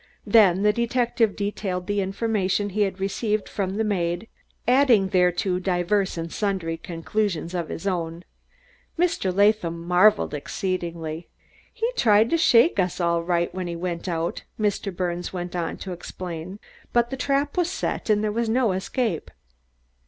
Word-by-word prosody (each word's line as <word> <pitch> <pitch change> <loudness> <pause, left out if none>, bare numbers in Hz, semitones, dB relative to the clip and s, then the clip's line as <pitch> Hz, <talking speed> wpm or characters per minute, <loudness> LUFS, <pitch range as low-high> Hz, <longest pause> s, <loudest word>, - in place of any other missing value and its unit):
Then 200 -4 +5
the 210 0 +4
detective 235 -1 +1
detailed 200 -3 -3
the 205 +1 0
information 200 0 0
he 210 +3 -1
had 195 -2 0
received 210 +2 -1
from 195 -1 -3
the 220 - 0
maid, 180 -1 -1 0.4
adding 245 -6 +4
thereto 180 0 +2
divers 185 +1 0
and 165 0 -5
sundry 190 -6 -1
conclusions 170 +1 -2
of 170 -3 -3
his 175 - -6
own. 170 -2 -2 0.7
Mr. 335 - +1
Latham 200 -3 +2
marveled 180 +5 +3
exceedingly. 170 0 -4 0.4
"He 460 -1 -1
tried 215 - +4
to 335 - +4
shake 245 - +5
us 180 -1 0
all 170 -1 +1
right 175 0 0
when 185 -1 -4
he 170 - -4
went 170 +1 -4
out," 165 0 -2 0.2
Mr. 205 -1 0
Birnes 175 -1 -3
went 175 -1 -5
on 170 -2 -2
to 190 - -7
explain, 175 +1 -7 0.4
"but 240 +1 +2
the - - -2
trap 280 +2 0
was 350 -1 +1
set 370 - -3
and 210 0 +3
there 215 - 0
was 230 +1 -1
no 235 -2 +2
escape." 190 +1 -2
190 Hz, 155 wpm, -24 LUFS, 175-215 Hz, 0.7 s, Then